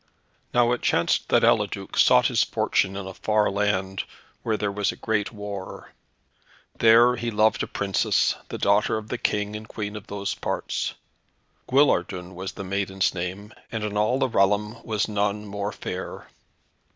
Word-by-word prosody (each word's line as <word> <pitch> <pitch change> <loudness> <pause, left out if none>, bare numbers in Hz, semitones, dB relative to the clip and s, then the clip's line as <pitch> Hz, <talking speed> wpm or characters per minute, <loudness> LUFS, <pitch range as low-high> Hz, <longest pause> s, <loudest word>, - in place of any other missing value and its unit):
Now 120 -1 +3
it 125 - 0
chanced - - +1
that - - +4
Eliduc - - +1
sought - - +5
his - - +3
fortune 95 0 +1
in 100 - -5
a 95 - -7
far 105 +1 +1
land, 95 -2 0 0.4
where 110 -2 -1
there 105 -1 -1
was 105 0 0
a - - -10
great 105 -2 -1
war. 105 -3 -7 0.9
There 120 +2 +6
he 120 0 -2
loved 110 0 +2
a - - -2
Princess, 100 -2 +1 0.2
the - - -4
daughter 100 +2 +2
of 110 0 -7
the 120 - -3
King 105 0 -1
and 110 0 -7
Queen 105 -2 -5
of 105 0 -8
those 100 -1 -3
parts. - - -3 0.7
Guillardun 95 -10 +2
was 95 +1 -6
the - - -7
maiden's 95 0 0
name, 95 +4 -5 0.2
and 110 -2 -3
in 105 -1 -3
all 105 +5 +2
the 135 -1 +1
realm 105 +1 +1
was 110 -1 -1
none 105 0 -1
more 100 0 -4
fair. - - -6
105 Hz, 165 wpm, -25 LUFS, 100-110 Hz, 0.9 s, There